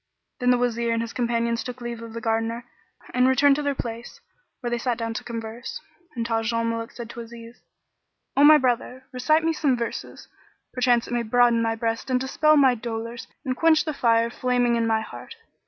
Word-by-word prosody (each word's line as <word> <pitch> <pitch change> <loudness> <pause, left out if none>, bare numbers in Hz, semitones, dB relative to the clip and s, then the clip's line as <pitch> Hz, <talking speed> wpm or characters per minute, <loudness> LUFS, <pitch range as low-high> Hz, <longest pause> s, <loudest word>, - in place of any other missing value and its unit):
Then 250 -1 +1
the 250 - +5
Wazir 235 -1 0
and 230 - 0
his 230 - -7
companions 235 -1 0
took 250 0 -7
leave 240 -1 -6
of 230 -1 -9
the 230 - -6
Gardener 225 +1 -1 0.5
and 250 0 +4
returned 275 +2 +5
to - - -1
their 285 -1 -1
place, 235 -1 -6 0.4
where 240 -2 -4
they 240 - 0
sat 240 -1 -1
down 230 -1 -3
to - - -5
converse. 230 +1 -6 0.4
And 230 -1 -2
Taj 225 0 0
al 230 0 0
Muluk 230 0 -3
said 235 -2 -8
to - - -9
Aziz, 230 0 -11 0.7
"O 280 - +4
my 305 +1 +9
brother, 255 0 -1
recite 310 +5 +2
me 325 0 +1
some 280 -5 +1
verses: 235 -1 -6 0.5
perchance 245 -2 +2
it - - -5
may 240 - +1
broaden 235 0 +3
my 225 0 0
breast 225 +2 -3
and 255 -1 +2
dispel 305 +4 +3
my 265 -3 +6
dolours 230 0 -5 0.2
and 255 -1 -1
quench 325 +2 +3
the 310 - -2
fire 230 -3 +2
flaming 245 -1 +1
in 230 -1 +1
my 220 -1 +2
heart." 340 - -10
240 Hz, 205 wpm, -24 LUFS, 230-255 Hz, 0.7 s, my